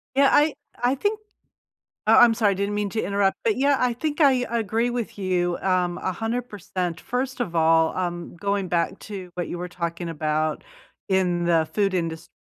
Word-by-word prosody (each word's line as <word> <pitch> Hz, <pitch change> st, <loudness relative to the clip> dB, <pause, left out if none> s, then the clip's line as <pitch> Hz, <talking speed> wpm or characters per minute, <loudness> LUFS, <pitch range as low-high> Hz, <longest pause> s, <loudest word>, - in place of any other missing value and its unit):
Yeah, 275 Hz, 0 st, +5 dB
I 295 Hz, 0 st, +4 dB, 0.3 s
I 250 Hz, +3 st, +3 dB
think 415 Hz, +9 st, -1 dB, 0.9 s
oh, -, -, +6 dB
I'm 235 Hz, -2 st, +7 dB
sorry, 215 Hz, -3 st, +2 dB
I -, -, -1 dB
didn't 200 Hz, +2 st, -2 dB
mean 205 Hz, 0 st, -1 dB
to 220 Hz, -, -2 dB
interrupt. 200 Hz, 0 st, +1 dB
But, 445 Hz, -2 st, +2 dB
yeah, 280 Hz, +1 st, +3 dB
I 250 Hz, -1 st, +2 dB
think 295 Hz, +6 st, -3 dB
I 260 Hz, -3 st, +4 dB
agree 230 Hz, 0 st, 0 dB
with 240 Hz, -3 st, -4 dB
you, 180 Hz, -2 st, 0 dB
um, 180 Hz, -2 st, 0 dB
100%. 195 Hz, -4 st, -3 dB
First 250 Hz, +1 st, -3 dB
of 175 Hz, -8 st, -2 dB
all, 160 Hz, 0 st, +3 dB
um, 175 Hz, -1 st, -3 dB
going 200 Hz, 0 st, -1 dB
back 170 Hz, -1 st, 0 dB
to 190 Hz, -4 st, -8 dB
what 175 Hz, -2 st, -3 dB
you 175 Hz, -, -5 dB
were 180 Hz, +1 st, -5 dB
talking 170 Hz, -1 st, -4 dB
about 155 Hz, -1 st, -1 dB, 0.4 s
in 180 Hz, -2 st, +1 dB
the 165 Hz, -2 st, +2 dB
food 200 Hz, -2 st, +1 dB
indust 165 Hz, -2 st, -3 dB
195 Hz, 185 wpm, -24 LUFS, 175-240 Hz, 0.9 s, I'm